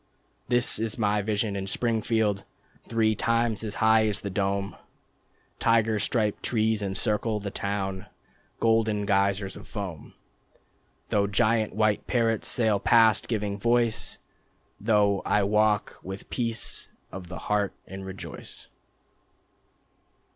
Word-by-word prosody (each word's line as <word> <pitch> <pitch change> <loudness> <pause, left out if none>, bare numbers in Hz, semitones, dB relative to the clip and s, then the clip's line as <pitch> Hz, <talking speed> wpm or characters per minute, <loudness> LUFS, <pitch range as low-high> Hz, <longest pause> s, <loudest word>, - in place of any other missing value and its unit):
This 120 -3 +4
is 110 -1 -1
my 105 -2 +1
vision 105 0 -1
in 95 -1 -4
Springfield: 110 -2 0 0.4
Three 110 -1 +2
times 115 0 0
as 105 -1 -4
high 110 0 +4
as 105 -1 -2
the 100 - -4
dome, 100 +1 -1 0.8
Tiger 115 -2 +2
striped 105 -1 0
trees 110 -2 +1
encircle 105 +2 -1
the 100 -1 -5
town, 95 -2 -3 0.5
Golden 110 -2 +2
geysers 100 -1 +1
of - - -11
foam; 95 -8 -7 0.9
Though 100 -1 +2
giant 110 +1 +1
white 110 -1 +1
parrots 115 -3 +1
sail 110 -4 +2
past, 110 -1 +4
giving 105 -3 -2
voice, 120 0 +1 0.6
Though 105 -2 +2
I 105 - +2
walk 105 0 +1
with 95 +1 -8
Peace 115 -2 -2 0.2
of 95 -2 -8
the 95 - -7
Heart 105 -1 -1
and 95 0 -8
rejoice. 95 0 -9
105 Hz, 120 wpm, -27 LUFS, 100-115 Hz, 0.9 s, This